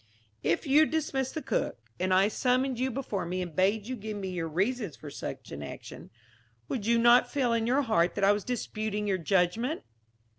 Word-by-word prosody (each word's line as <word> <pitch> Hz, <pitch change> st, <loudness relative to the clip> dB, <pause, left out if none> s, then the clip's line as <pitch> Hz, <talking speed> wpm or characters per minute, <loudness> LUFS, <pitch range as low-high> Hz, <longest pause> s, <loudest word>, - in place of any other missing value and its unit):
"If 165 Hz, -, 0 dB
you 300 Hz, +3 st, +5 dB
dismissed 275 Hz, -4 st, -1 dB
the 315 Hz, -, -3 dB
cook, -, -, -1 dB, 0.2 s
and 185 Hz, +1 st, 0 dB
I 190 Hz, +2 st, +5 dB
summoned 255 Hz, +2 st, +1 dB
you 260 Hz, +1 st, +1 dB
before 240 Hz, -6 st, -3 dB
me 180 Hz, +2 st, -3 dB
and 170 Hz, -4 st, -8 dB
bade 200 Hz, +3 st, +2 dB
you 255 Hz, +2 st, -4 dB
give 215 Hz, -2 st, -6 dB
me 190 Hz, -2 st, -4 dB
your 175 Hz, -3 st, -3 dB
reasons 195 Hz, -, -1 dB
for 150 Hz, -, -9 dB
such -, -, -7 dB
an 70 Hz, -, -6 dB
action, 70 Hz, -, -9 dB, 0.6 s
would 225 Hz, -5 st, -3 dB
you 235 Hz, 0 st, +4 dB
not 240 Hz, +1 st, +6 dB
feel 255 Hz, -5 st, +1 dB
in 230 Hz, -1 st, +1 dB
your 270 Hz, +4 st, +3 dB
heart 175 Hz, -8 st, +2 dB
that 200 Hz, -, -2 dB
I 200 Hz, -, +6 dB
was 205 Hz, 0 st, 0 dB
disputing 215 Hz, -3 st, -3 dB
your 190 Hz, -2 st, +1 dB
judgment?" 195 Hz, -, +1 dB
215 Hz, 200 wpm, -29 LUFS, 185-255 Hz, 0.6 s, not